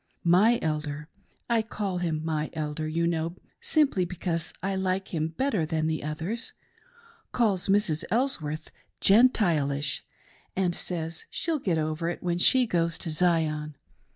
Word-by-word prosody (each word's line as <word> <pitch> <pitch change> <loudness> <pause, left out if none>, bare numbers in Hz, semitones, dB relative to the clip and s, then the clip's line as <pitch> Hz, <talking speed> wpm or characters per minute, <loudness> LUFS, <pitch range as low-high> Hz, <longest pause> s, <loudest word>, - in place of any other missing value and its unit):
My 195 +8 +5
Elder 150 -1 -3 0.2
— - - -37
I - - +3
call 205 -4 -3
him 160 -3 -2
my 155 -1 -1
elder, 155 0 -3
you 165 +2 0
know, 170 0 -1 0.2
simply 285 - +2
because 170 -2 -3
I 195 0 0
like 190 0 -1
him 160 -2 -1
better 205 - 0
than 155 0 -1
the 155 -1 -1
others 160 - -4 0.4
— 465 -1 -28
calls 210 -7 +1
Mrs. 195 -5 +2
Elsworth 180 - -1 0.2
' - - -39
Gentilish,' 170 - +3 0.5
and 185 -2 +1
says 165 -2 -4
she'll 325 -3 -1
get 180 -10 0
over 155 +2 -1
when 175 -1 -1
she 255 +7 +5
goes 170 -5 0
to 165 - -3
Zion. 155 -3 +1
170 Hz, 150 wpm, -27 LUFS, 155-195 Hz, 0.5 s, My